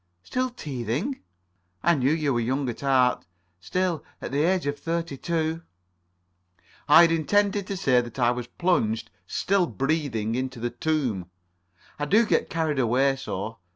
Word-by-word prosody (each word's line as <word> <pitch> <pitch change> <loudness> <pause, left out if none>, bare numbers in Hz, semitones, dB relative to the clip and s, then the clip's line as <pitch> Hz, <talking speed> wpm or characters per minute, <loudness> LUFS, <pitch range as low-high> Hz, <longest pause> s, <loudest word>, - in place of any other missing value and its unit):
"Still 255 - -1
teething? 145 - -3 0.6
I 170 - +5
knew 135 -2 +2
you 155 -3 +1
were 120 - +1
young 130 +4 -1
at 115 - -6
heart. 130 -2 +3 0.4
Still, 180 - -1 0.2
at - - -6
the 140 +2 +1
age 185 -3 0
of 145 0 -2
thirty 165 -1 -2
two——" 160 +2 -2 1.3
"I 150 - +9
had 165 - +4
intended 200 +4 +1
to 200 - -3
say 130 -9 +3
that 120 0 -9
I 120 -2 +3
was 125 -1 -4
plunged, 120 -9 0 0.2
still 190 -2 +1
breathing, 135 -8 -1
in 130 +2 -1
the 120 -1 -4
tomb. 120 - -1 0.7
I 145 - 0
do 215 +9 +4
get - - +1
carried 160 -4 -1
away 130 +3 +3
so. 115 -4 -5
145 Hz, 155 wpm, -26 LUFS, 125-170 Hz, 1.3 s, I